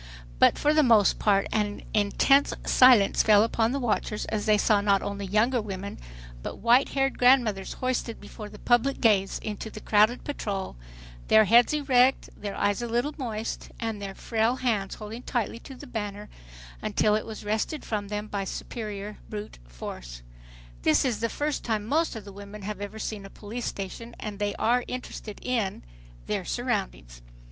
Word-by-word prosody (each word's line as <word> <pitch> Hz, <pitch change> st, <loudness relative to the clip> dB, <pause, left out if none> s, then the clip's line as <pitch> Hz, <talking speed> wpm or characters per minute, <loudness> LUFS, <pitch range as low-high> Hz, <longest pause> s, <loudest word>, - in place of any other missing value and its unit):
But -, -, +5 dB
for 295 Hz, +1 st, +2 dB
the 310 Hz, -, +5 dB
most 225 Hz, -7 st, +4 dB
part 200 Hz, -2 st, +3 dB
an 210 Hz, -2 st, -1 dB
intense 220 Hz, +7 st, +3 dB
silence 250 Hz, -6 st, +6 dB
fell 210 Hz, -1 st, +6 dB
upon 225 Hz, 0 st, +1 dB
the 280 Hz, -, -1 dB
watchers, 215 Hz, -3 st, -1 dB
as 215 Hz, 0 st, -3 dB
they 215 Hz, -1 st, +5 dB
saw 205 Hz, 0 st, +3 dB
not 200 Hz, -1 st, +2 dB
only 200 Hz, -1 st, -4 dB
younger 225 Hz, +5 st, +2 dB
women, 200 Hz, -1 st, -6 dB, 0.4 s
but -, -, -5 dB
whitehaired 270 Hz, +3 st, +3 dB
grandmothers 240 Hz, -6 st, +3 dB
hoisted 255 Hz, -2 st, -2 dB
before 210 Hz, +1 st, -9 dB
the 210 Hz, -, -12 dB
public 240 Hz, +5 st, +2 dB
gaze 200 Hz, -5 st, +3 dB
into 215 Hz, +1 st, -5 dB
the 215 Hz, -, -9 dB
crowded 215 Hz, +3 st, +3 dB
patrol, 200 Hz, -, -4 dB, 0.5 s
their 220 Hz, 0 st, +6 dB
heads 235 Hz, +4 st, +6 dB
erect, 270 Hz, -3 st, +3 dB
their 200 Hz, -1 st, -6 dB
eyes 205 Hz, +2 st, 0 dB
a 240 Hz, -, -3 dB
little 240 Hz, +6 st, -1 dB
moist 225 Hz, -4 st, -4 dB
and 225 Hz, -3 st, -3 dB
their 195 Hz, -1 st, -6 dB
frail 225 Hz, +1 st, 0 dB
hands 220 Hz, -7 st, -1 dB
holding 220 Hz, +2 st, -8 dB
tightly 235 Hz, -2 st, -2 dB
to 265 Hz, -, -11 dB
the 290 Hz, -, -11 dB
banner 210 Hz, -4 st, -5 dB, 0.5 s
until 210 Hz, -, +1 dB, 0.3 s
wrested 220 Hz, +8 st, -2 dB
from 205 Hz, -2 st, -3 dB
them 210 Hz, +1 st, -3 dB
by 200 Hz, -2 st, -3 dB
superior 210 Hz, 0 st, -6 dB
brute 210 Hz, -, -7 dB
force. -, -, -8 dB, 0.6 s
This -, -, +3 dB
is 235 Hz, -5 st, 0 dB
the 230 Hz, +1 st, 0 dB
first 295 Hz, +3 st, -2 dB
time 215 Hz, -3 st, -1 dB
most 315 Hz, +4 st, +1 dB
of 215 Hz, -3 st, -8 dB
the 200 Hz, -, -10 dB
women 200 Hz, +1 st, -10 dB
have 205 Hz, 0 st, -5 dB
ever 205 Hz, +2 st, -6 dB
seen 215 Hz, -2 st, -4 dB
a 195 Hz, -, -10 dB
police 225 Hz, +4 st, -6 dB
station, 215 Hz, +4 st, -6 dB
and 210 Hz, -2 st, -6 dB
they 205 Hz, -1 st, -1 dB
are 245 Hz, +2 st, +2 dB
interested 240 Hz, -4 st, -6 dB
in, 230 Hz, -6 st, -1 dB, 0.4 s
their -, -, -2 dB
surroundings. -, -, -3 dB
215 Hz, 170 wpm, -27 LUFS, 205-240 Hz, 0.6 s, silence